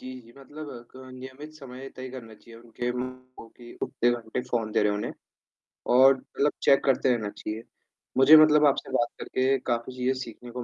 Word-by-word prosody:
जी, 130 - -8
जी, 115 0 -18
मतलब 140 -3 -10
क - - -17 0.2
नियमित 130 +4 -10
समय 135 -2 -10
तय 130 0 -7
करना 115 -4 -10
चाहिए 115 +1 -16
उनके 120 +1 -4
उम, 125 0 -2 0.4
उ - - -10
कि 120 -1 -12
उतने 120 - +1
घंटे 120 0 -3
फ़ोन 115 -3 -2
दे - - +2
रहे 105 0 +2
उन्हें, 105 - -3 0.7
और 130 +2 +6
मतलब 145 +2 -2
चेक 135 - +4
करते 130 -1 +2
रहना 105 -3 -4
चाहिए। 110 +2 -7 0.5
मुझे 145 +4 +9
मतलब 150 -1 +6
आपसे 135 - -1
बात 120 -2 +2
करके 130 +1 0
काफ़ी 120 +2 -3
चीज़ें 125 +1 +1
सीखने 120 +1 -11
को 125 0 -6
125 Hz, 190 wpm, -26 LUFS, 120-135 Hz, 0.7 s, मुझे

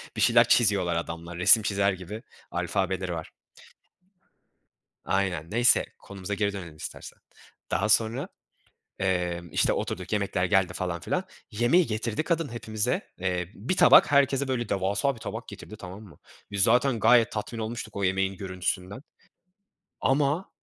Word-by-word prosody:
bir - - -2
şeyler 115 0 +6
çiziyorlar 100 -7 +3
adamlar, 85 +1 -5
resim 105 +4 +6
çizer 100 -1 +1
gibi 95 +6 -8 0.3
alfabeleri 95 -2 -1
var. 80 -1 -6 1.7
Aynen, 90 -4 -1
neyse. 120 +3 +3
Konumuza 100 0 -7
geri 100 0 0
dönelim 85 -6 -8
istersen. 75 - -9 0.5
Daha 105 +2 +1
sonra, 115 +4 +2 0.7
emm, 90 -2 -1
işte, - - +2
oturduk, 90 +2 -4
yemekler 100 -3 0
geldi 95 -1 +2
falan 85 -1 -3
filan. 185 - -2 0.3
Yemeği 120 - +3
getirdi 110 +4 -2
kadın 165 -2 -1
hepimize. 110 -2 -2
Eee, 90 -1 -2
bir 130 - -3
tabak 175 -3 +7
herkese 140 -1 +3
böyle 120 -4 -2
devasa 100 +9 0
bir 115 - -14
tabak - - -6
getirdi, 110 - -10
tamam 95 +2 -9
mı? 95 - -16 0.3
Biz 100 -1 0
zaten 120 +2 +3
gayet 115 0 +5
tatmin 110 +2 -5
olmuştuk 110 -1 -5
o 100 - -1
yemeğin 95 +1 0
görüntüsünden. 95 +3 -4 1.0
Ama 145 +6 +1
100 Hz, 140 wpm, -27 LUFS, 90-120 Hz, 1.7 s, tabak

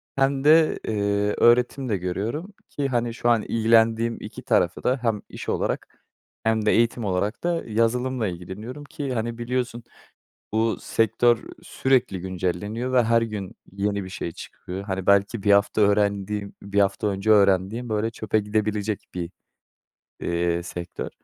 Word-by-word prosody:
hem 135 0 +1
de, 155 +1 +5
eee, 100 -1 0
öğretim 125 +2 +3
de 105 - +1
görüyorum 110 - -3 0.2
ki, 140 -1 -2
hani, 120 -2 -1
şu 120 +1 0
an 115 -2 +4
ilgilendiğim 115 +1 +2
2 105 - -8
tarafı 100 -8 +1
da 130 +2 +1
hem 115 -4 0
iş - - -7
olarak - - -1 0.6
hem 110 -1 +1
de - - +4
eğitim 115 -1 +2
olarak 100 +3 -1
da 170 -1 0
yazılımla 115 +2 0
ilgileniyorum 100 +10 -7
ki, 140 -2 -5
hani, 115 0 -2
biliyorsun 120 0 -2 0.7
bu 110 +1 +1
sektör 115 +1 +2 0.2
sürekli 125 -8 +1
güncelleniyor 95 +7 -3
ve 125 -2 +4
her 115 +1 +3
gün 105 -4 -5 0.2
yeni 100 0 -1
bir 95 - -8
şey 85 -2 -5
çıkıyor. 90 +3 -8
Hani, 95 -2 -4
belki 100 +2 +3
1 100 - +4
hafta 100 +2 +3
öğrendiğim, 100 0 +1
1 100 0 0
hafta 100 +1 +1
önce 100 +1 0
öğrendiğim, 100 +3 +3
böyle, 110 +1 0
çöpe 110 -1 -1
gidebilecek 105 0 -1
bir, 85 -1 -4 0.9
iii, 85 0 0
sektör. 85 0 -6
110 Hz, 150 wpm, -24 LUFS, 100-120 Hz, 0.9 s, de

